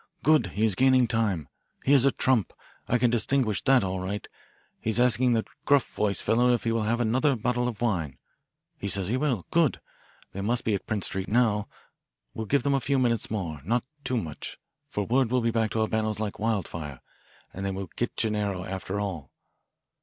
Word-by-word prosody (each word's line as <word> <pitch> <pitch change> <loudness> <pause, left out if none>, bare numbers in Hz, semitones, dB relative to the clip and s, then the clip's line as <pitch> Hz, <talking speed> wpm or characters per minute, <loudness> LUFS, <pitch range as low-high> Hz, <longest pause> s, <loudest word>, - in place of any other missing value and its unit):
"Good 155 -1 +4
he 110 - +3
is 110 - +2
gaining 130 +4 +4
time. 105 - 0 0.4
He 140 - +4
is 135 -2 +6
a 140 - +5
trump. 125 -7 +1 0.3
I 125 - +2
can 120 -1 +2
distinguish 120 -2 +1
that 135 -4 +5
all 95 0 -2
right. 100 +3 -4 0.5
He's 110 +2 0
asking 125 0 +4
the 110 -1 +1 0.2
gruff 140 -2 +3
voiced 105 -2 0
fellow 120 +2 +3
if 120 - -5
he 115 - 0
will 115 0 +1
have 120 +1 +1
another 130 +5 +2
bottle 125 +2 0
of 120 -3 -5
wine. 85 - -1 0.6
He 100 - -3
says 100 -1 +1
he 125 - +1
will. 130 - 0
Good. 165 -4 +2 0.5
They 100 - -5
must 115 +4 0
be 110 - +1
at 100 - -3
Prince 105 -3 -1
Street 95 0 -3
now 105 -3 +2 0.7
we'll 110 -1 -5
give 140 +4 +2
them 140 -1 +2
a 135 - +3
few 135 +4 +1
minutes 120 -3 +1
more, 85 -9 -3
not 115 +7 0 0.2
too 125 - -1
much, 80 -9 -5 0.3
for 105 -7 -2
word 125 +3 +2
will 125 +1 +2
be 115 0 +1
back 110 -1 +1
to 110 - +1
Albano's 110 -1 0
like 105 -2 -3
wildfire, 85 - -2 0.5
and 95 - -6
they 100 - -1
will 95 -3 -5
get 120 - -3
Gennaro 105 -4 0
after 95 +1 -4
all. 90 -9 -4
110 Hz, 200 wpm, -27 LUFS, 100-125 Hz, 0.7 s, is